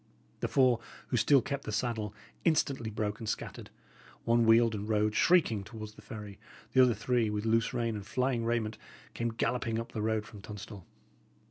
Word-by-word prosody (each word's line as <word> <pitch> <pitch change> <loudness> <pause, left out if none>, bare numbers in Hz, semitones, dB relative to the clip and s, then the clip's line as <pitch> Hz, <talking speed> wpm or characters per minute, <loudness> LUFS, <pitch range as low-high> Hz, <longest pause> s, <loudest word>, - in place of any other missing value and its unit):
The - - -1
four 130 -4 +4 0.3
who 125 - +1
still 135 +2 +5
kept 140 -1 -3
the - - -4
saddle 110 -1 -1 0.3
instantly 140 -7 +1
broke 105 0 -3
and 110 - -4
scattered; - - -5 0.6
one 115 0 +3
wheeled 115 0 +6
and 105 +1 -4
rode, 105 0 +2
shrieking, 120 - +3
towards 110 0 -8
the - - -15
ferry; 105 -5 -9 0.3
the 130 - +7
other 125 -3 +5
three, 115 +1 +1
with 105 +1 -2
loose 115 +1 +2
rein 115 -2 -1
and 105 - -5
flying 125 +2 0
raiment, 115 -2 -1 0.3
came 120 0 -1
galloping 115 0 -1
up 115 - -6
the 110 - -3
road 110 0 0
from 105 -2 -12
Tunstall. 105 -2 -9
115 Hz, 180 wpm, -31 LUFS, 105-120 Hz, 0.6 s, the